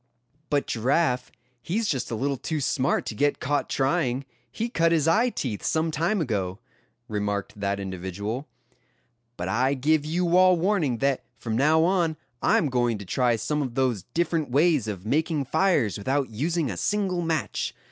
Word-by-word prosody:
"But 145 -1 +1
Giraffe, 125 +2 +1 0.3
he's 205 - -1
just 135 -9 -1
a 115 - -2
little 140 +5 -1
too 155 +4 -3
smart 135 -1 0
to - - -4
get 145 +7 +1
caught 145 +2 -1
trying; 135 -2 0 0.3
he 230 - -2
cut 165 -8 +2
his 160 -2 +2
eye 225 +9 +4
teeth 120 - -4
some 160 0 0
time 170 +7 0
ago;" 100 - -2 0.5
remarked 105 -1 -3
that 100 0 -1
individual. 100 +7 -4 0.9
"But 90 - -3
I 130 +7 +1
give 150 +3 +2
you 170 +3 0
all 185 -1 +6
warning 170 - +1
that 140 -2 +1 0.2
from 110 0 -3
now 155 +6 +4
on 170 -3 +1 0.2
I - - +4
am 150 - +1
going 120 -3 +1
to 100 - -9
try 120 +5 +2
some 115 +7 -1
of 130 -4 -4
those 130 -6 +1
different 165 -3 0
ways 145 -2 +3
of 100 -3 -5
making 150 +3 0
fires 145 - +2
without 130 +4 -1
using 155 +4 -1
a 90 - -6
single 195 - 0
match. 165 -2 -2
140 Hz, 170 wpm, -26 LUFS, 115-165 Hz, 0.9 s, all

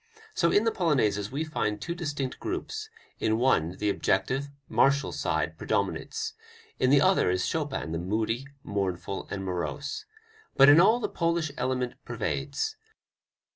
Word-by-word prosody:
So 170 - +2
in 205 - +4
the 225 - +2
polonaises 110 - +1
we 145 +4 -1
find 105 -9 -2
two 170 - -3
distinct 145 -6 -3
groups: 430 +5 -4 0.3
in 110 0 +1
one 95 -9 +2
the 105 -1 +1
objective, 130 +10 0 0.2
martial 140 +1 +3
side - - -1
predominates, 445 0 -2 0.5
in 130 - +3
the 140 +1 +6
other 190 - +4
is 90 0 +1
Chopin 145 - -2
the 80 - -2
moody, 110 +7 -1 0.2
mournful 95 -1 -3
and 95 -1 -4
morose. 90 - -3 0.5
But 135 +1 +9
in 150 +4 +8
all 220 +6 +5
the - - -1
Polish 165 -2 0
element 125 -1 -1
pervades. 440 0 -2
135 Hz, 145 wpm, -28 LUFS, 105-170 Hz, 0.5 s, But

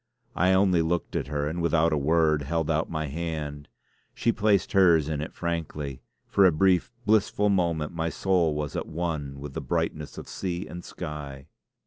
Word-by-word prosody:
I 90 +2 +3
only 95 -3 +4
looked 85 +1 -1
at - - -1
her, 75 0 -1
and 85 +3 -3
without 85 -1 +2
a - - +3
word 80 0 +3
held 80 +3 -1
out 80 +1 0
my 80 -2 -2
hand. 75 -1 -4 0.5
She 115 - +2
placed 105 -4 +2
hers 85 -6 +5
in 75 -2 -2
it 80 - -5
frankly; 80 -5 -4 0.2
for 100 - +3
a - - +4
brief, 90 +6 +2
blissful 105 -1 +3
moment 85 -6 0
my 85 0 -1
soul 85 -4 +1
was 75 -1 -3
at - - -3
one 80 -4 -3
with 70 -1 -7
the - - -4
brightness 75 -1 -2
of - - -8
sea 90 -2 -4
and 90 0 -8
sky. 75 -5 -7
80 Hz, 180 wpm, -27 LUFS, 75-90 Hz, 0.5 s, hers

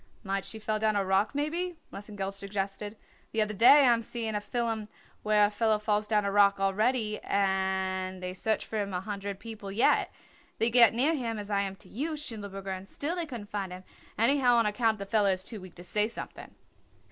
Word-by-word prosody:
"Might 195 0 -2
she 220 - -6
fell 215 0 -2
down 215 -1 +1
a 200 -1 +1
rock 195 +7 +1
maybe?" 335 +4 -2 0.2
Lesengeld 200 -1 -5
suggested. 200 +1 -4 0.4
"The 220 -1 +3
other 215 0 -4
day 260 +7 +7
I 245 - +6
am 230 - 0
seeing 225 -1 -4
a 210 - -1
fillum 225 -1 -2 0.3
where 210 -1 +4
a 205 - -1
feller 220 0 +2
falls 210 0 0
down 210 -1 +2
a 200 - 0
rock 200 -1 +4
already 215 +3 +1
and 190 -1 0
they 180 0 -3
search 220 +3 -1
for 220 - -4
him 200 -2 -2
a 180 - -1
hundred 200 0 -5
people 210 -2 -8
yet. 215 +5 +3 0.5
They 230 +1 +1
get 235 -1 +7
near 280 +7 +3
him 235 -7 -2
as 205 0 -6
I 200 -1 +2
am 195 -1 -3
to - - -16
you, 300 +9 -3
Schindelberger, 200 -8 -6
and 190 +2 -10
still 315 +5 -3
they 345 -2 -3
couldn't 230 -7 -8
find 195 -3 -3
him 185 +1 -8 0.3
anyhow 245 +1 +4
on 230 -1 +4
account 220 +1 +1
the 200 - -6
feller 205 -1 +2
is 185 0 -4
too 210 0 -6
weak 185 -2 -12
to 175 - -10
say 210 +4 +1
something." 230 - -8
210 Hz, 215 wpm, -29 LUFS, 195-230 Hz, 0.5 s, day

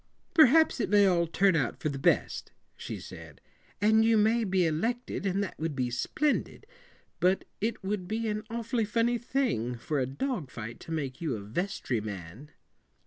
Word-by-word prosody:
"Perhaps 315 -2 +6
it 220 - 0
may 205 -1 +6
all 175 -3 +3
turn 195 +2 +3
out 135 -7 0
for 155 - -1
the 140 -1 -4
best," - - +1 0.2
she - - -6
said, - - -11 0.4
"and 220 +2 +4
you 225 0 +4
may 220 +2 +3
be 190 -3 +2
elected, 200 +7 -1
and 195 +2 0
that 195 - -7
would 160 -2 -2
be 125 -2 -1
splendid. 295 - -1 0.5
But 185 +2 +2 0.2
it 220 -1 -2
would 190 -2 -2
be 225 +3 -2
an 210 0 -1
awfully 230 0 -1
funny 230 +3 +1
thing 235 - -1
for 145 +5 -2
a 130 - 0
dog 165 - -3
fight 115 -1 -7
to - - -10
make 140 -4 -3
you 155 -7 -1
a 105 - -6
vestry 120 - -2
man." 100 - -8
190 Hz, 180 wpm, -29 LUFS, 140-225 Hz, 0.5 s, Perhaps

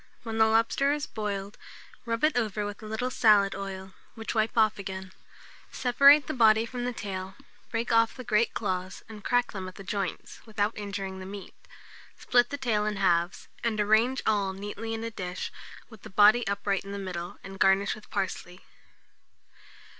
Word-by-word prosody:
When 225 -1 -4
the 220 - +6
lobster 230 +5 +2
is 295 0 -2
boiled, 205 -3 -5 0.5
rub 230 +2 -2
it 305 0 +3
over 215 -3 -1
with 205 0 -6
a 215 - -8
little 220 +4 -2
salad 210 -5 +4
oil, 190 -1 -7 0.2
which 225 -1 -5
wipe 220 0 0
off 215 -2 +3
again; 190 -1 -6 0.6
separate 280 +3 +6
the - - -3
body 225 -2 +5
from 245 +1 -5
the 245 - -1
tail, 190 -4 -6 0.3
break 230 +1 -2
off 230 0 +3
the 255 - -8
great 230 0 +1
claws, 185 -3 -3
and 215 -2 -11
crack 245 0 +1
them 190 -2 -6
at 185 - -10
the 195 - -10
joints, 195 -1 -4
without 215 -1 -1
injuring 195 -2 -5
the 185 - -8
meat; 200 0 -9 0.6
split 245 -1 +3
the 285 - -4
tail 230 -6 0
in 210 - -1
halves, 175 -2 +1 0.2
and 225 -2 0
arrange 220 +5 +3
all 200 -3 +1
neatly 205 +3 -5
in 225 - -5
a 230 - -4
dish, 180 -4 -5 0.4
with 220 -3 -13
the - - -10
body 210 +4 +5
upright 200 0 -1
in 200 0 -8
the - - -4
middle, 180 -3 -5
and 195 0 -9
garnish 195 +1 +3
with 215 - -13
parsley. 185 -2 -4
210 Hz, 185 wpm, -28 LUFS, 195-230 Hz, 0.6 s, the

